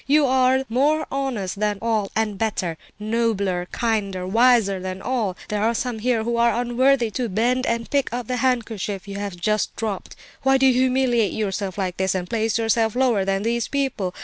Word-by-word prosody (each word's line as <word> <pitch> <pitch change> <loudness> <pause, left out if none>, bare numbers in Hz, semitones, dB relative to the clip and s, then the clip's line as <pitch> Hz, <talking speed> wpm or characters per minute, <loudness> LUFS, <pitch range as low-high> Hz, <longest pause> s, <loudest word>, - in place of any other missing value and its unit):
You 295 +1 +4
are 260 0 +3
more 295 +6 +2
honest 240 -9 -3
than 210 -1 0
all, 220 -3 -1
and 220 -2 0
better, 190 -5 -2 0.2
nobler, 210 -5 -1
kinder, 200 -6 -1
wiser 225 -1 +3
than 185 0 -5
all. 215 -5 -2
There 210 -1 -1
are 230 +2 +1
some 240 -1 -2
here 235 -1 +1
who 235 +1 -1
are 235 0 +3
unworthy 245 0 +2
to 240 +1 -2
bend 245 +6 +1
and 230 0 -1
pick 280 -2 0
up 245 0 -3
the 250 +2 -2
handkerchief 220 -6 -1
you 200 0 -5
have 200 -3 -4
just 215 +5 0
dropped. 210 -4 -4 0.3
Why 270 0 +4
do 265 - +3
you 260 - +6
humiliate 250 -4 +2
yourself 200 -2 -3
like 185 -2 -2
this, 190 0 0
and 180 -1 -2
place 225 0 0
yourself 225 0 +1
lower 245 -6 +2
than 195 0 0
these 235 +1 0
people? 260 -10 -2
225 Hz, 190 wpm, -22 LUFS, 200-250 Hz, 0.3 s, you